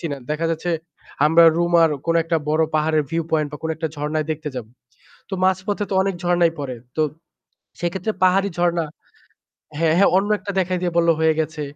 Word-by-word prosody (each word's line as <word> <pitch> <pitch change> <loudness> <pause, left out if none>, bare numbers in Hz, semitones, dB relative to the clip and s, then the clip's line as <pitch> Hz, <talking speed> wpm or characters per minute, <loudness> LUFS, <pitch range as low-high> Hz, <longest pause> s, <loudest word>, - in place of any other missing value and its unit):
চিনে। 150 -4 -3
দেখা 155 +2 -1
যাচ্ছে 165 +2 -2 0.6
আমরা 165 +2 +6
রুমার 170 -1 +4 0.2
কোন 165 - +2
একটা 165 0 0
বড় 155 +1 +2
পাহাড়ের 155 0 +2
viewpoint 160 -2 0
বা 150 - -5
কোন 160 - -2
একটা 160 0 -2
ঝর্ণায় 150 +1 -2
দেখতে 155 0 -3
যাব। 125 -4 -5 0.6
তো - - -5
মাঝপথে 190 +3 0
তো - - -2
অনেক 195 -1 -1
ঝরণাই 175 -1 +3
পড়ে। 130 -3 -4 0.2
তো 155 - +1 0.8
সেক্ষেত্রে 180 +4 -2
পাহাড়ি 195 +2 +3
ঝরণা 175 -1 +1 0.9
হ্যাঁ, 160 -1 +2
হ্যাঁ। 200 - +5
অন্য 195 +2 +2
একটা 200 - -5
দেখায় 185 -1 0
দিয়ে 175 -1 -1
বললো 170 0 +4
হয়ে 160 -1 +3
গেছে। 155 -1 -3
165 Hz, 180 wpm, -21 LUFS, 155-175 Hz, 0.9 s, আমরা